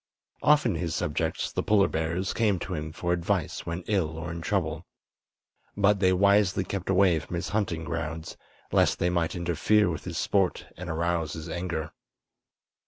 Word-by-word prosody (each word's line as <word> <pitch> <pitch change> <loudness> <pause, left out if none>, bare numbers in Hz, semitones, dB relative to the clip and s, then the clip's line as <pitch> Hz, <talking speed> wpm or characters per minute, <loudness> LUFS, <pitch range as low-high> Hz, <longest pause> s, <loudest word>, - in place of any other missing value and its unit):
Often 145 - +4
his 85 -1 -2
subjects, 80 +2 -1
the - - -1
polar 100 -2 +4
bears, 80 +4 -1
came 105 -4 +2
to - - -5
him 75 +1 -4
for 85 +2 -1
advice 90 -1 -1
when 85 +2 -3
ill 85 -7 0
or 85 +1 -5
in 85 0 -5
trouble; 85 -3 -1 0.9
but 100 0 +4
they 95 -1 +4
wisely 100 0 +3
kept 95 0 -4
away 95 -3 +4
from 80 - -7
his 85 - -3
hunting 95 -6 -1
grounds, 80 -1 -4 0.4
lest - - +3
they 90 - +1
might 85 -2 0
interfere 85 +4 +2
with 80 - -6
his - - -4
sport 95 -3 +1
and 90 0 -7
arouse 85 -1 -1
his 80 0 -7
anger. 85 -3 -3
85 Hz, 170 wpm, -27 LUFS, 80-95 Hz, 0.9 s, Often